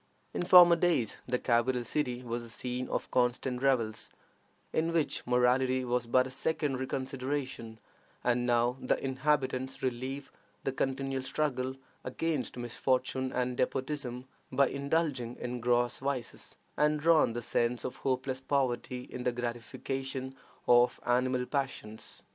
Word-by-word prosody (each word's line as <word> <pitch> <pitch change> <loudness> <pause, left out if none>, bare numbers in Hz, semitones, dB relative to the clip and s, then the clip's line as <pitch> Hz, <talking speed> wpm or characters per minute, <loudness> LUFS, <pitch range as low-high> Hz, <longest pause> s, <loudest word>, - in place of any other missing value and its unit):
In - - -2
former 175 -1 +8
days 165 -9 +1
the 125 0 +1
capital 120 +1 +1
city 125 -1 -2
was 120 0 -3
the 120 - -9
scene 125 +2 -3
of - - -3
constant 125 0 +1
revels, 120 -5 +1 0.6
in 165 +1 +1
which 165 -3 +1
morality 125 +1 +3
was 120 -1 0
but 130 +2 +4
a 130 - -7
secondary 135 -2 -1
consideration, 130 -3 -3 0.5
and 120 0 +1
now 120 +1 +2
the - - +1
inhabitants 135 -1 0
relieve 130 +2 -3 0.3
the 135 - 0
continual 135 0 -1
struggle 130 -2 -1 0.3
against 145 0 -2
misfortune 130 +2 -1
and 125 0 -1
despotism 130 -1 -2 0.3
by 140 -1 +3
indulging 140 -4 -1
in 125 0 -4
gross 120 0 +1
vices, 135 -3 -4 0.2
and 150 0 +2
drown 160 -7 +4
the 120 0 -4
sense 120 +1 0
of 130 - -4
hopeless 130 0 -1
poverty 130 -2 -1
in 125 - -7
the 125 - +1
gratification 130 +2 -4 0.3
of 120 0 +5
animal 125 +1 +2
passions. 130 -6 -4
130 Hz, 135 wpm, -31 LUFS, 125-135 Hz, 0.6 s, former